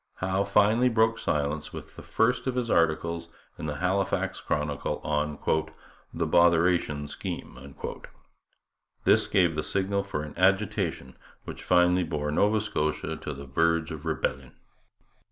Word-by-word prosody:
Howe 95 +1 0
finally 110 +5 +4
broke 115 -1 +2
silence 75 +1 -1
with - - -10
the - - -9
first 125 +3 +1
of 130 - -1
his 125 -2 -1
articles 85 +1 +1 0.3
in 75 - -4
the 75 - -3
Halifax 95 +4 -1
Chronicle 75 -1 -2
on 75 0 -1 0.7
'The - - -2
Botheration 85 -4 +3
Scheme.' 70 -1 -7 1.3
This - - +4
gave 85 -4 +3
the 75 - 0
signal 100 +4 -1
for 100 -7 -4
an 75 - -8
agitation 95 -8 0 0.2
which - - -8
finally 90 0 +3
bore 75 -3 -2
Nova 105 +7 +3
Scotia 80 -5 -2
to 75 - -6
the 70 +1 -9
verge 80 +3 +1
of - - -7
rebellion. 65 -1 -3
85 Hz, 135 wpm, -27 LUFS, 75-100 Hz, 1.3 s, finally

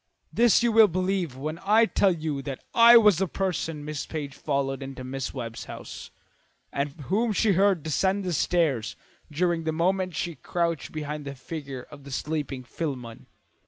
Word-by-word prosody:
This 235 0 +4
you 235 - +3
will 220 -1 +7
believe 185 -5 -1
when 155 +4 -4
I 215 +3 +5
tell 200 -3 +2
you 155 -4 -3
that 135 -1 -6
I 235 0 +9
was 210 -6 +5
the 190 - +1
person 165 -5 -3
Miss 150 -1 -4
Page 145 -3 -5
followed 140 -2 -2
into 135 -1 -7
Mrs. 130 +1 -5
Webb's 115 -3 -6
house - - -9 0.6
and 140 +1 -1
whom 215 - 0
she 215 +1 +3
heard 190 -3 +3
descend 190 +6 0
the 180 -2 -2
stairs 150 -8 +1 0.4
during 170 +1 0
the 160 - 0
moment 185 +2 0
she 175 - -2
crouched 170 -1 -2
behind 150 -1 -5
the 140 0 -6
figure 135 -2 -7
of 145 -2 -12
the 140 - -11
sleeping 145 -2 -3
Philemon." 125 -5 -6
160 Hz, 170 wpm, -26 LUFS, 140-190 Hz, 0.6 s, I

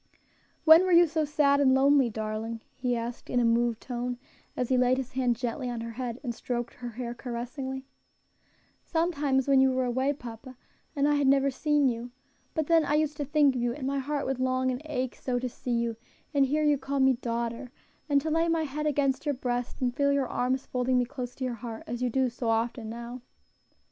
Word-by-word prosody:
"When 320 +2 +9
were 375 - 0
you 345 0 +7
so 315 -1 0
sad 285 -1 +3
and 265 -2 +5
lonely, 275 -1 +4
darling?" 220 +1 -4
he 250 -2 -1
asked 235 +1 -6
in 245 - +1
a 240 - +3
moved 230 0 +2
tone, 245 0 -3 0.4
as 250 - -1
he 260 - +3
laid 250 0 +3
his 260 -1 -4
hand 250 -2 +1
gently 245 +2 -3
on 240 -1 -4
her 230 0 -5
head, 245 0 -5
and 240 -3 -2
stroked 240 0 -4
her 245 -1 -7
hair 240 +1 -5
caressingly. 260 +3 -5 1.0
"Sometimes 295 -6 0
when 270 -1 +5
you 265 0 +4
were 255 0 0
away, 260 +3 +1
papa, 250 -1 -10 0.4
and 285 0 +2
I 295 - +3
had 285 -2 +2
never 275 0 +4
seen 295 +1 +2
you; 240 0 -2 0.5
but 315 -2 0
then 330 +1 +4
I 295 - +1
used 305 -1 +1
to 290 - -2
think 290 -1 +3
of 250 - -2
you, 240 0 0
and 270 0 -6
my 275 +1 0
heart 285 +1 -2
would 265 -1 -2
long 255 0 +1
and 250 +1 -4
ache 260 -5 -3
so 250 -2 -2
to 250 +1 -2
see 250 - -8
you, 235 -1 0 0.4
and 275 -2 +4
hear 305 +3 +1
you 295 -2 +3
call 280 0 -2
me 265 0 +5
daughter, 235 0 -3 0.4
and 285 -1 +4
to 315 +2 -2
lay 330 +1 +2
my 330 -1 +1
head 300 +1 -3
against 280 -1 0
your 290 - +1
breast 245 0 -3
and 245 -1 0
feel 280 0 +2
your 280 -2 +1
arms 255 +2 -1
folding 250 0 0
me 245 - +2
close 250 -1 -6
to 265 - -6
your 255 -1 -1
heart, 230 -1 -7
as 240 +1 -5
you 250 - +1
do 260 +2 +2
so 235 -1 -3
often 225 0 -1
now." 235 +2 -7
255 Hz, 225 wpm, -28 LUFS, 240-280 Hz, 1.0 s, When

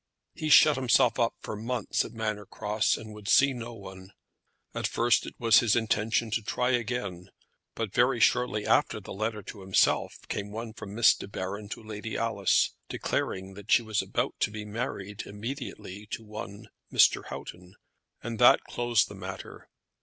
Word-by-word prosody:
He 155 - -4
shut 150 -1 +7
himself 125 -1 +3
up 115 -1 +1
for - - -5
months 115 +1 -1
at - - -8
Manor 110 -3 -3
Cross, 105 +1 0
and 110 -1 -9
would 105 -1 -11
see 135 +4 +5
no 120 -1 -7
one. 95 -2 -11 0.6
At - - -1
first 120 0 +2
it - - -9
was 115 -1 +6
his 115 -3 +2
intention 110 0 0
to 110 - 0
try 125 +4 0
again, 105 -7 -2 0.5
but 110 -4 -3
very 125 0 +3
shortly 125 -3 +2
after - - +2
the - - -9
letter 110 +1 -3
to 100 +1 -9
himself 95 0 +2
came 100 0 -4
one 110 +1 -6
from 100 -1 -9
Miss 115 0 +6
De - - -8
Baron 100 +1 -5
to 115 - -7
Lady 110 0 -5
Alice, 110 -4 +2 0.2
declaring 95 +1 -3
that 100 +2 -9
she 120 - +6
was 110 -2 0
about - - -2
to - - +1
be 105 0 -7
married 105 -2 -5
immediately 105 -3 -7
to 115 - -5
one 105 -1 -9 0.2
Mr. - - +4
Houghton; 90 +7 -9 0.5
and 115 -1 -5
that 120 - +7
closed 120 -2 +1
the - - -10
matter. 95 -1 -9
110 Hz, 175 wpm, -28 LUFS, 100-120 Hz, 0.6 s, shut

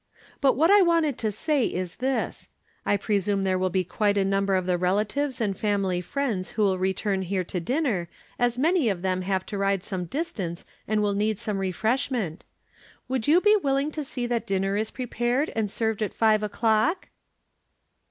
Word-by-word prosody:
But 275 -2 +5
what 325 +6 +4
I 410 0 +7
wanted 330 -6 +2
to 215 -2 0
say 290 +5 0
is 180 -1 -4
this: 265 +1 -2 0.4
I 205 - +3
presume 200 -1 0
there 185 -1 +1
will 185 0 +1
be 185 +1 +1
quite 205 +3 0
a 195 - +2
number 195 0 +1
of 185 -1 0
the 180 -1 +1
relatives 210 +10 0
and 205 -4 0
family 195 -3 0
friends 210 -4 -2
who 215 - -1
will 190 -2 +2
return 190 +1 0
here 190 0 -1
to 180 +1 -4
dinner, 225 - -1 0.3
as 240 0 +1
many 315 -2 +3
of 185 -3 -3
them 185 -1 0
have 190 0 -1
to 205 - -5
ride 195 -1 +1
some 190 -3 -3
distance, 190 - -4 0.2
and 215 0 +1
will 205 -1 +1
need 210 +1 0
some 210 -2 -3
refreshment, 215 - -1 0.6
would 255 -3 -2
you 330 +5 +5
be 420 +1 +5
wil 280 -10 +1
ling 280 +3 0
to 305 0 -4
see 255 -3 -4
that 240 -1 -2
dinner 195 0 0
is 215 +1 -1
prepared 250 +3 -1
and 220 -2 0
served 220 +1 -1
at 210 - -2
five 215 -1 +3
o'clock?" 220 - +1
210 Hz, 190 wpm, -26 LUFS, 190-255 Hz, 0.6 s, I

